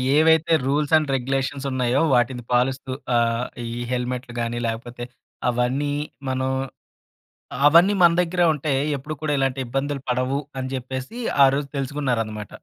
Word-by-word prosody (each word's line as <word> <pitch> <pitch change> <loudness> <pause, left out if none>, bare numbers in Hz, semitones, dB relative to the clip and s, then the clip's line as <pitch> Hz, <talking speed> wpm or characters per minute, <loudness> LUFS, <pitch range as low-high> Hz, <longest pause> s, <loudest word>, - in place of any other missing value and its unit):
ఏవైతే 160 +1 +4
rules 145 +3 0
and 155 -3 -1
regulations 135 +2 -2
ఉన్నాయో 130 +1 +1
వాటిని 120 0 +1
పాలిస్తూ 130 +2 +1 0.2
ఆహ్, 115 +1 +1 0.2
ఈ - - -5 0.2
హెల్మెట్లు 125 0 -3
గాని 120 0 -2
లేకపోతే 120 +2 -5 0.5
అవన్నీ 125 +4 0 0.4
మనం 130 0 -1 1.2
అవన్నీ 170 +7 +6
మన 170 -1 +7
దగ్గరే 175 0 +1
ఉంటే 150 0 -2 0.2
ఎప్పుడు 150 +4 -6
కూడా 155 -1 -1
ఇలాంటి 135 0 0
ఇబ్బందులు 135 +3 -2
పడవు 130 +3 0 0.2
అని 130 0 -3
జెప్పేసి 130 - -5 0.3
ఆరోజు 140 +1 0
తెలుసుకున్నారన్నమాట. 120 -7 -2
130 Hz, 130 wpm, -23 LUFS, 125-145 Hz, 1.2 s, మన